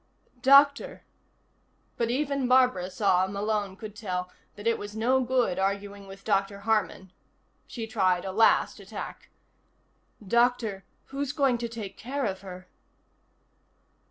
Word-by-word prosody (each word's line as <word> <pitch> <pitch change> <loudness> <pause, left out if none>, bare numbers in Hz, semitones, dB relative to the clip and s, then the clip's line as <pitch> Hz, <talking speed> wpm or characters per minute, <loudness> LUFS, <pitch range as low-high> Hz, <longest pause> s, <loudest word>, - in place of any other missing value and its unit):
"Doctor 280 +2 +5 0.5
" - - -41
But 230 -1 +1
even 275 0 0
Barbara 250 -8 +3
saw, 190 -2 +2
Malone 200 0 -2
could 210 +1 -9
tell, 180 -4 -4 0.2
that 205 - -11
it 230 0 +2
was 205 +1 -7
no 250 +4 +2
good 245 -6 +1
arguing 200 +1 -2
with 195 0 -12
Dr. 200 -1 0
Harman. 205 -3 -1 0.6
She 230 -2 -5
tried 190 -5 +1
a 190 - -3
last 220 +3 +3
attack. - - -8 1.0
"Doctor, 235 -3 +1 0.3
who's 280 0 -2
going 270 -5 +2
to 235 0 -3
take 220 -4 -7
care 270 +3 -3
of 190 -3 -3
her?" 185 -2 -10
215 Hz, 130 wpm, -27 LUFS, 195-245 Hz, 1.0 s, Doctor